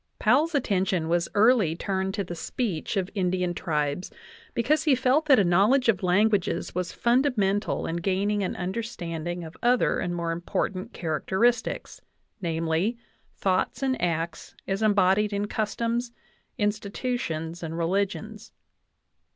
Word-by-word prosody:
I - - -11
Powell's 320 +2 +3
attention 190 - 0
was 170 0 +1
early 210 -6 +4
turned 190 +2 -2
to 200 - -1
the 175 - -6
speech 175 +1 -3
of 190 0 -1
Indian 180 -2 0
tribes, 150 0 -2 0.5
because 295 +8 +2
he 290 -4 +5
felt 265 +5 +2
that 270 -3 +7
a 205 - +5
knowledge 205 +9 +4
of 195 -5 +2
languages 190 -1 +1
was 180 -1 -2
fundamental 235 -6 +1
in 165 - -2
gaining 195 +4 0
an 190 - -2
understanding 175 -4 -4
of 160 +1 -9
other 245 +1 +3
and 175 0 -2
more 170 -1 -2
important 185 +5 -3
characteristics 190 +9 -1 0.4
namely, 165 +6 0 0.4
thoughts 190 +7 0
and 260 -1 0
acts 165 -1 -2
as 195 +2 -1
em 215 -2 +3
bodied 200 +2 +3
in 200 0 0
customs, 230 +3 -1 0.5
institutions, 205 -6 -2
and 165 -1 -5
religions. 200 +5 -2
195 Hz, 135 wpm, -26 LUFS, 175-230 Hz, 0.5 s, that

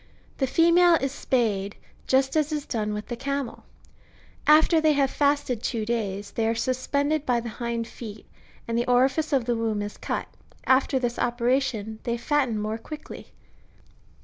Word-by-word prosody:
^ - - -29
The 265 - +1
female 340 +4 +5
is 275 -4 -1
spayed, 215 -8 -1 0.3
just 265 +1 +2
as 305 -1 +1
is 300 -1 -2
done 215 -3 -2
with 210 0 -4
the 240 - -4
camel; 275 +1 -4 0.8
after 315 +2 +6
they 310 -1 +4
have 275 -2 +2
fasted 285 -5 +1
two 225 -3 -2
days, 205 -3 -3
they 225 -1 0
are 225 - +1
suspended 280 +5 0
by 245 -4 +1
the 235 0 -5
hind 235 0 -3
feet, 215 -3 -9 0.4
and 230 - -2
the 240 +1 0
orifice 265 +5 +2
of 265 -5 +2
the 240 0 0
womb 220 -2 -1
is 205 - -7
cut; - - -3 0.4
after 265 +1 +3
this 245 -2 -2
ope 240 0 -1
ration, 235 -4 0
they 235 0 -2
fatten 250 -1 0
more 215 +2 -3
quickly. 305 +6 -9
245 Hz, 175 wpm, -25 LUFS, 225-280 Hz, 0.8 s, after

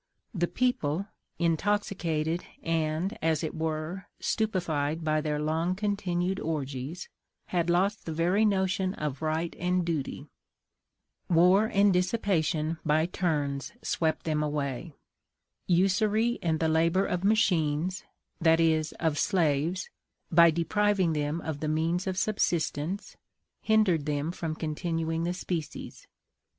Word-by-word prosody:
The 175 -3 0
people 185 - 0 0.3
intoxicated 170 -2 0 0.2
and, 165 +4 -1
as 160 0 +1
it 160 - -3
were, 160 +3 -3
stupefied 165 -7 -1
by 155 -1 +1
their 150 -1 -1
long 160 +4 0
continued 190 -2 -1
orgies 145 +1 -4 0.5
had 175 -1 +1
lost 190 +4 +1
the - - -2
very 175 +6 +2
notion 190 -2 +1
of 150 -2 -4
right 160 +2 -1
and 180 0 +1
duty: 155 -6 -3 1.0
war 180 +5 +5
and 200 0 +4
dissipation 175 -5 0
by 155 +1 +2
turns 145 -6 -2
swept 160 -1 0
them 155 -2 0
away; 145 0 -3 0.7
usury 210 +6 +2
and 160 -2 0
the 160 - +2
labor 165 +4 +2
of 180 0 -2
machines 185 -5 +2 0.4
(that 165 -1 +4
is 160 -1 +2
of 160 -3 -1
slaves), 170 -1 +1 0.4
by 170 0 +7
depriving 185 +2 +1
them 150 +2 -1
of 155 -3 -4
the 155 - -2
means 165 +4 0
of 185 -1 -2
subsistence, 175 -3 -1 0.4
hindered 195 -9 +2
them 150 +2 -1
from 165 -3 -4
continuing 165 +1 -2
the 175 - -1
species. 170 -4 -5
165 Hz, 120 wpm, -28 LUFS, 155-185 Hz, 1.0 s, by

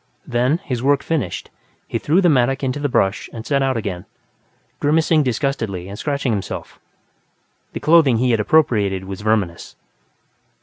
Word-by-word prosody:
Then, 125 +6 +1
his 125 -8 -3
work 140 +1 +2
finished, 140 - -3 0.4
he - - -2
threw 165 +6 +2
the 180 - +4
mattock 135 -2 +2
into 135 +2 -1
the 145 0 -1
brush 95 -4 0
and 115 -1 -8
set 140 -2 +1
out 135 -2 +1
again, 95 -5 -4 0.7
grimacing 155 +1 +3
disgustedly 115 -8 -2
and 100 +2 -8
scratching 140 -4 -1
himself. 100 -3 -5 0.9
The - - -4
clothing 155 -7 +5
he 125 +2 +2
had 115 - +2
appropriated 105 -8 +2
was 95 +1 -7
verminous. 105 -6 -1
125 Hz, 150 wpm, -20 LUFS, 105-145 Hz, 0.9 s, clothing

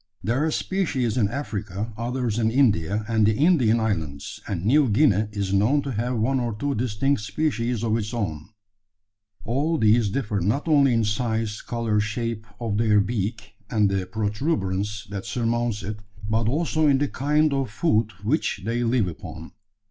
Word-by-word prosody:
There 120 +6 +1
are 160 - +1
species 150 - -1
in 115 -5 +2
Africa, 110 -4 -4
others 120 -1 -2
in 110 -1 +2
India 105 - +2
and 110 -1 +2
the 105 0 +3
Indian 135 -9 +4
islands, 80 -10 -3
and 95 -3 -3
New 135 +3 +4
Guinea 110 -3 +3
is 100 -2 -2
known 120 +9 +3
to 140 - -3
have 120 +2 -1
one 130 +5 +1
or 120 -3 -2
two 140 +6 -1
distinct 125 +2 0
species 115 +1 -1
of 110 -1 +1
its 110 -2 -2
own. 90 -10 -3 1.0
All 145 +8 0
these 110 -2 +4
differ 105 -2 -1
not 110 - 0
only 140 -4 +5
in 115 -1 +2
size, 110 0 -1
colour, 115 -3 -1
shape 110 0 -3
of 110 -3 -1
their 110 -2 +4
beak, 105 0 -2 0.2
and 105 -3 +2
the 95 -1 -1
protuberance 105 - -2
that 100 -1 -5
surmounts 120 -2 -1
it; 105 +2 -5 0.3
but 110 +1 +1
also 155 +2 +1
in 140 -2 +5
the 145 +2 +1
kind 150 +2 +1
of 135 -3 -1
food 110 -2 +1
which 135 +3 0
they 120 +2 0
live 115 -4 +2
upon. 80 -1 -8
115 Hz, 170 wpm, -24 LUFS, 105-130 Hz, 1.0 s, only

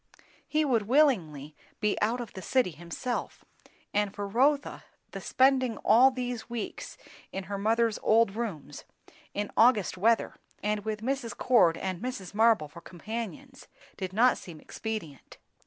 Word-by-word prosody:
He 310 0 +1
would 230 -7 +1
willingly 175 - +2 0.2
be 210 -1 +1
out 230 +4 +1
of 235 -3 -7
the 190 - -8
city 255 -3 +1
himself; 175 - -5 0.5
and 205 -1 +1
for 205 0 -4
Rotha, 275 +7 +1 0.3
the - - -7
spending 260 -3 +2
all 240 +5 +7
these 245 -2 -5
weeks 235 -2 -6 0.3
in 195 - -4
her 200 +1 -5
mother's 225 +1 +1
old 220 -2 +3
rooms, 215 -11 -5 0.5
in 205 0 -3
August 220 -6 +3
weather, 225 +4 +2 0.3
and 210 0 0
with 215 0 -4
Mrs. 260 -2 -3
Cord 215 -10 +4
and 185 -1 -4
Mrs. 245 -7 -5
Marble 220 -7 +3
for 170 +4 -13
companions, 230 +9 -7 0.3
did 185 -1 -5
not 240 +6 +3
seem 165 -4 -11
expedient. 210 - -7
220 Hz, 145 wpm, -28 LUFS, 195-245 Hz, 0.5 s, all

